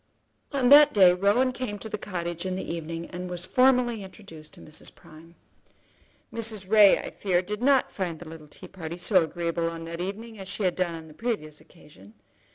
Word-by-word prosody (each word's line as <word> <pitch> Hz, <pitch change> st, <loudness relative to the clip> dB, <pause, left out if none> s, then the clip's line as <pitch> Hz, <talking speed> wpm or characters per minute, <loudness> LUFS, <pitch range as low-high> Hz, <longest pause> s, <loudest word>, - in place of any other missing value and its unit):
On 265 Hz, -4 st, +1 dB
that 290 Hz, -1 st, +8 dB
day 185 Hz, -3 st, +7 dB
Rowan 205 Hz, +8 st, +2 dB
came 250 Hz, -4 st, -5 dB
out 205 Hz, -, -12 dB
to 220 Hz, -, -6 dB
the -, -, -3 dB
cottage 175 Hz, -4 st, -4 dB
in 185 Hz, -1 st, -3 dB
the 190 Hz, -, -5 dB
evening 165 Hz, 0 st, -5 dB
and 180 Hz, 0 st, -6 dB
was 180 Hz, 0 st, -5 dB
formally 250 Hz, -3 st, +2 dB
introduced 185 Hz, -6 st, -13 dB
to -, -, -16 dB
Mrs. 155 Hz, -, -9 dB
Prime. 165 Hz, +2 st, -17 dB, 1.0 s
Mrs. 220 Hz, -4 st, -1 dB
Ray, 210 Hz, -1 st, +7 dB
I -, -, -6 dB
fear, 185 Hz, -2 st, 0 dB
did 210 Hz, +4 st, -5 dB
not 270 Hz, 0 st, +3 dB
find 175 Hz, -4 st, -4 dB
the 175 Hz, -, -11 dB
little 160 Hz, -1 st, -11 dB
tea 145 Hz, -, -12 dB
party 170 Hz, -2 st, -8 dB
so 180 Hz, +1 st, +3 dB
agreeable 170 Hz, 0 st, -2 dB
on 165 Hz, 0 st, -7 dB
that 170 Hz, +1 st, -6 dB
evening 215 Hz, +4 st, -6 dB
as 190 Hz, -, -8 dB
she 205 Hz, -, -4 dB
had 180 Hz, -2 st, +1 dB
done 175 Hz, -2 st, -1 dB
on 160 Hz, -1 st, -10 dB
the 155 Hz, -, -14 dB
previous 155 Hz, -8 st, -4 dB
occasion. 110 Hz, -, -18 dB
185 Hz, 205 wpm, -26 LUFS, 165-215 Hz, 1.0 s, that